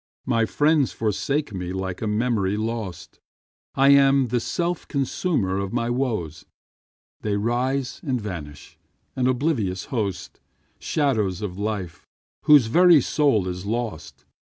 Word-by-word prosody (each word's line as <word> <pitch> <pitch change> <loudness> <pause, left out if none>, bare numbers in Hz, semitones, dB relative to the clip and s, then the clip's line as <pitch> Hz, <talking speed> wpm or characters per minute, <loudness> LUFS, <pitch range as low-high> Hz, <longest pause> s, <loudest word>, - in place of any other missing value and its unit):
My 115 -3 +1
friends 150 0 +2
forsake 115 +5 -2
me 90 -1 -4
like 95 -1 -4
a 110 - -1
memory 105 -2 0
lost. 110 -6 -5 0.6
I 135 +1 +4
am 140 -2 +5
the 120 +1 +1
self 170 +8 -2
consumer 135 - -1
of 100 +1 -4
my 120 0 0
woes; 110 - -2 0.8
They 105 -1 -1
rise 125 +5 -1
and 130 -6 -1
vanish, 80 -9 -8 0.4
an 125 -1 +1
oblivious 125 - 0
host, 100 -6 -3 0.4
Shadows 110 - 0
of 95 -2 -5
life, 100 -5 -4 0.4
whose 150 -5 +7
very 170 +7 +6
soul 135 -8 +1
is 90 +2 -5
lost. 115 -6 -4
115 Hz, 130 wpm, -23 LUFS, 95-135 Hz, 0.8 s, whose